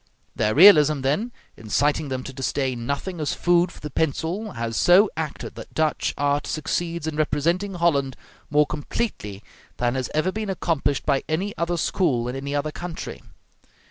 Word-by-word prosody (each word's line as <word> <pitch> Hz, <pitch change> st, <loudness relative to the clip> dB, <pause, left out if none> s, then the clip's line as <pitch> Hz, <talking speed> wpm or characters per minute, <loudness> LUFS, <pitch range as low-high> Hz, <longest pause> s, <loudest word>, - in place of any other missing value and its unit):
Their 105 Hz, 0 st, +1 dB
realism, 155 Hz, -5 st, +7 dB
then, 150 Hz, -, 0 dB, 0.2 s
inciting 145 Hz, +7 st, 0 dB
them 130 Hz, -1 st, -3 dB
to 135 Hz, -, -8 dB
disdain 130 Hz, -2 st, -2 dB
nothing 165 Hz, +5 st, -3 dB
as 150 Hz, -, -1 dB
food 175 Hz, 0 st, +2 dB
for -, -, -14 dB
the 150 Hz, -, -6 dB
pencil, 165 Hz, +8 st, -2 dB
has 115 Hz, 0 st, -4 dB
so 190 Hz, -, +5 dB
acted 155 Hz, -2 st, -5 dB
that -, -, -11 dB
Dutch 155 Hz, -1 st, 0 dB
art 145 Hz, 0 st, 0 dB
succeeds 165 Hz, +1 st, -2 dB
in 160 Hz, -1 st, -3 dB
representing 170 Hz, +6 st, 0 dB
Holland 140 Hz, -6 st, +1 dB, 0.3 s
more 150 Hz, +1 st, +4 dB
completely 125 Hz, -, -4 dB, 0.3 s
than 120 Hz, 0 st, 0 dB
has 130 Hz, -1 st, -2 dB
ever 155 Hz, +5 st, +1 dB
been 215 Hz, 0 st, -4 dB
accomplished 155 Hz, -7 st, -1 dB
by 140 Hz, -2 st, +1 dB
any 190 Hz, +6 st, -1 dB
other 170 Hz, +1 st, -1 dB
school 140 Hz, -8 st, 0 dB
in 125 Hz, -, -4 dB
any 140 Hz, +1 st, -4 dB
other 145 Hz, +1 st, -1 dB
country. 175 Hz, +1 st, -7 dB
150 Hz, 165 wpm, -24 LUFS, 135-175 Hz, 0.3 s, realism